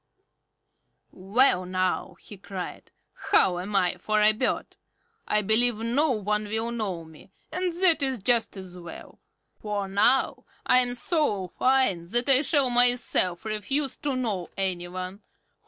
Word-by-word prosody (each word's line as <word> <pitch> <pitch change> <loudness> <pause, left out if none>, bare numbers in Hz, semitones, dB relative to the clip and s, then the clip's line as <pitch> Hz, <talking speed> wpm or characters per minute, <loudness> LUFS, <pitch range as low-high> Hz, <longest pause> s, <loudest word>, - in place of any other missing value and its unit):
"Well 195 +1 +2
now!" 185 0 -2
he 210 - -12
cried. 190 -1 -8 0.4
"How 175 -1 +4
am 200 +3 -5
I 180 -2 +1
for 215 +3 0
a 210 0 +5
bird? 230 +4 -3 0.5
I 210 0 +1
believe 225 +3 +4
no 240 +8 0
one 210 -3 -1
will 225 +2 -2
know 195 -8 -4
me, 160 +2 -16 0.2
and 365 0 -1
that 335 -4 +5
is 265 -2 +1
just 230 0 0
as 185 -2 -9
well; 170 -2 -11 0.4
for 205 -2 -3
now 215 +7 +1 0.2
I 255 - +5
am 245 -1 +1
so 240 - 0
fine 255 -10 +1
that 240 +6 +1
I 270 0 +6
shall 285 -4 +1
myself 245 -7 +1
refuse 220 +7 -2
to 285 -3 -3
know 215 -9 -3
any 185 -2 -2
one. 185 +3 -7
215 Hz, 145 wpm, -26 LUFS, 185-250 Hz, 0.5 s, I